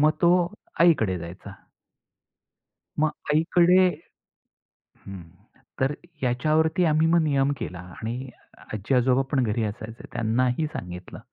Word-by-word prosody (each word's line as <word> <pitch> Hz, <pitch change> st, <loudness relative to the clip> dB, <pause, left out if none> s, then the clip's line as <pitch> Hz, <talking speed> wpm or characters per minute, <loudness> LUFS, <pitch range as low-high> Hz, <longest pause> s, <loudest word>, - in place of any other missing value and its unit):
मग 155 Hz, +1 st, +5 dB
तो 170 Hz, -, +6 dB, 0.5 s
आईकडे 110 Hz, -, +4 dB
जायचा. 90 Hz, +4 st, -9 dB, 1.5 s
मग 155 Hz, 0 st, +3 dB, 0.2 s
आईकडे 175 Hz, +4 st, +4 dB, 1.2 s
हं, 95 Hz, -2 st, -8 dB, 0.6 s
तर 135 Hz, +2 st, +1 dB, 0.3 s
याच्यावरती 155 Hz, +8 st, +2 dB
आम्ही 155 Hz, 0 st, +3 dB
मग 170 Hz, 0 st, +4 dB
नियम 140 Hz, -2 st, +2 dB
केला 90 Hz, -5 st, -5 dB, 0.2 s
आणि 125 Hz, +4 st, -4 dB, 0.4 s
आजी-आजोबा 125 Hz, +5 st, +2 dB
पण 130 Hz, -3 st, +2 dB
घरी 110 Hz, +1 st, 0 dB
असायचे 110 Hz, +2 st, -6 dB
त्यांनाही 125 Hz, +6 st, 0 dB
सांगितलं. 90 Hz, -, -8 dB
130 Hz, 105 wpm, -25 LUFS, 110-155 Hz, 1.5 s, तो